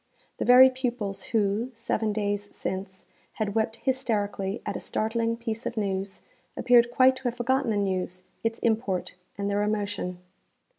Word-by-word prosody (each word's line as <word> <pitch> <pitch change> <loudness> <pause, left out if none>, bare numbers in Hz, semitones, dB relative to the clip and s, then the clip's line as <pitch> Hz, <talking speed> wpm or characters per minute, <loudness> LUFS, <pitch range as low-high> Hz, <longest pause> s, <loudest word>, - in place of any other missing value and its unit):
The - - -2
very 255 +1 +8
pupils 240 -7 -3
who, 215 +2 0
seven 225 -1 -1
days 205 -1 -2
since, 190 0 -5 0.3
had 210 -2 -2
wept 220 +1 0
hysterically 210 -6 -1
at - - -3
a - - -3
startling 230 +1 -1
piece 230 0 -4
of 235 - -5
news, 195 -2 -2 0.3
appeared 240 -1 +5
quite 255 +2 +5
to 260 - -13
have 245 -1 0
forgotten 260 +1 +1
the 215 - +1
news, 185 -2 -2 0.2
its 225 0 0
import, 220 -5 0 0.2
and 200 0 -2
their 205 0 +1
emotion. 205 -3 -2
220 Hz, 155 wpm, -27 LUFS, 200-240 Hz, 0.3 s, very